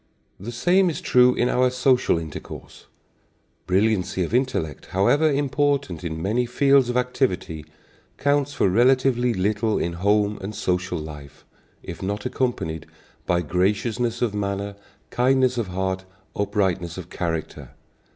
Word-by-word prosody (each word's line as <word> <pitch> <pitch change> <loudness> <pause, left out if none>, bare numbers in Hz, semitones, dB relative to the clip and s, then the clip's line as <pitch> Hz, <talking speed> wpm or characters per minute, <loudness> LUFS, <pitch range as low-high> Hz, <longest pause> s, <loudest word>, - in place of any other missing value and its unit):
The 105 +6 -6
same 180 +9 +3
is 160 - -4
true 125 0 +4
in 120 - +1
our 125 0 +2
social 125 -5 +2
intercourse. 80 -3 -9 0.8
Brilliancy 95 -1 +1
of 85 - -5
intellect, 125 - -1
however 145 +12 +3
important 140 - 0
in 80 -2 -4
many 115 +8 0
fields 135 +1 +3
of 120 - 0
activity, 95 - -1 0.5
counts 145 0 +1
for 145 - +1
relatively 125 +3 +3
little 105 +2 0
in 85 - -2
home 105 +3 +1
and 100 +3 -6
social 90 -1 -1
life, 75 -3 -10 0.4
if 85 - -8
not 100 +2 -3
accompanied 80 -11 -2 0.4
by 85 0 +2
graciousness 110 +8 0
of 115 -4 0
manner, 100 0 -3 0.4
kindness 130 0 +2
of 115 - -2
heart, 95 0 -3 0.3
uprightness 95 -4 -1
of 90 -1 -9
character. 80 -3 -4
105 Hz, 130 wpm, -23 LUFS, 90-125 Hz, 0.8 s, true